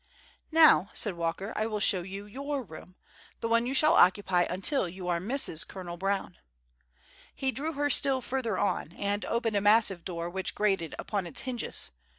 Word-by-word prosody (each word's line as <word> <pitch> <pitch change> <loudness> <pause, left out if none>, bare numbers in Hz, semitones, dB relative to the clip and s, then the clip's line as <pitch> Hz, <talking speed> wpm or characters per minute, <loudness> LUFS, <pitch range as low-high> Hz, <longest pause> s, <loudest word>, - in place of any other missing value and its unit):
"Now," 310 - +6
said 205 - +1
Walker, 170 +5 -3
"I 215 - -1
will 215 -2 -3
show 190 -2 +3
you 195 +3 -8
your 275 +5 -4
room—one 230 +6 -5
you 265 - -1
shall 305 +4 +5
occupy 185 - +4
until 190 - 0
you 180 +1 -8
are 170 -1 +1
Mrs. 205 - 0
Colonel 180 -3 -7
Brown." 195 0 -3 1.0
He 265 -1 -1
drew 305 +5 -4
her 290 0 0
still 270 -1 +3
further 245 -5 -2
on, 200 -5 -1
and 205 +2 -2
opened 230 -2 -1
a - - +1
massive 205 -4 +4
door, 170 -2 -4
which 190 +2 -3
grated 195 -6 0
upon 200 -4 -3
its 165 - -4
hinges. 245 - -3
205 Hz, 165 wpm, -29 LUFS, 180-250 Hz, 1.0 s, Now